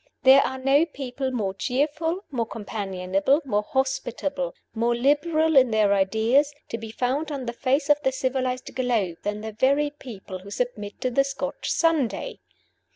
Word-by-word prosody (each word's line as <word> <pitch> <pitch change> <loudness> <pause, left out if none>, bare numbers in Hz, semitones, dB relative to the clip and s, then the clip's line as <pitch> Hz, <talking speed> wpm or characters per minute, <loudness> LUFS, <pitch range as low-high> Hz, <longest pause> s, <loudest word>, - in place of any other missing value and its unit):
There 265 +1 +8
are 265 0 -2
no 275 +5 +3
people 270 -3 -4
more 215 -7 -2
cheerful, 300 - -1
more 235 -4 -1
companionable, 195 +3 -1
more 210 -5 +1
hospitable, 265 - -2 0.2
more 235 +1 +1
liberal 310 +5 +2
in 260 -2 +6
their 215 -2 +3
ideas, 220 +9 +2 0.2
to 230 - -4
be 225 0 -7
found 260 +7 -1
on 275 -3 -4
the 235 - -3
face 275 +4 0
of 295 0 +4
the 265 - +1
civilized 255 -1 -2
globe 230 -9 0
than 210 0 -3
the 220 0 -5
very 280 +6 +2
people 210 -9 -9
who 195 +2 -12
submit 210 -2 -4
to 255 - 0
the 275 +3 +3
Scotch 275 0 -4
Sunday! 330 - 0
255 Hz, 160 wpm, -25 LUFS, 220-280 Hz, 0.2 s, There